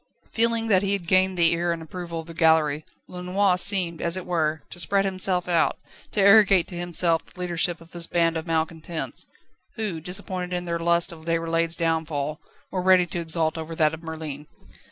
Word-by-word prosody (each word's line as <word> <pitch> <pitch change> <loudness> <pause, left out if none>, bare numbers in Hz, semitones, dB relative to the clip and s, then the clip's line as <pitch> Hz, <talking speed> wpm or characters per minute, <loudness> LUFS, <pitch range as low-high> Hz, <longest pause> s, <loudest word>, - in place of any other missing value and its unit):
Feeling 230 0 +2
that 195 -5 +3
he 200 0 0
had 195 -4 -2
gained 185 +1 +3
the 170 -1 +4
ear 170 +1 0
and 170 - -3
approval 170 +1 -6
of - - -14
the 165 - -10
gallery, 160 -2 +2 0.2
Lenoir 180 +1 0
seemed, 180 -3 +3
as 170 +2 0
it 185 - -6
were, 160 -3 -1
to 175 - -6
spread 195 +4 +2
himself 185 -2 0
out, 170 -2 +1 0.3
to - - -2
arrogate 200 -2 +6
to 180 - -8
himself 175 -1 +1
the - - -17
leadership 175 -1 -1
of 165 0 -17
this 170 -1 -3
band 165 -1 +1
of 160 +1 -4
malcontents, 160 0 -3 0.5
who, 210 -8 -3
disappointed 180 0 -4
in 175 0 -4
their 170 -1 -2
lust 170 +2 +2
of 160 -1 -12
Déroulède's 165 0 0
downfall, 160 -2 -2 0.3
were 185 - -2
ready 185 -1 +5
to 175 +1 -5
exult 160 -1 0
over 160 +1 -6
that 155 -1 +2
of 160 - -7
Merlin. 155 -3 -7
170 Hz, 195 wpm, -24 LUFS, 165-185 Hz, 0.5 s, arrogate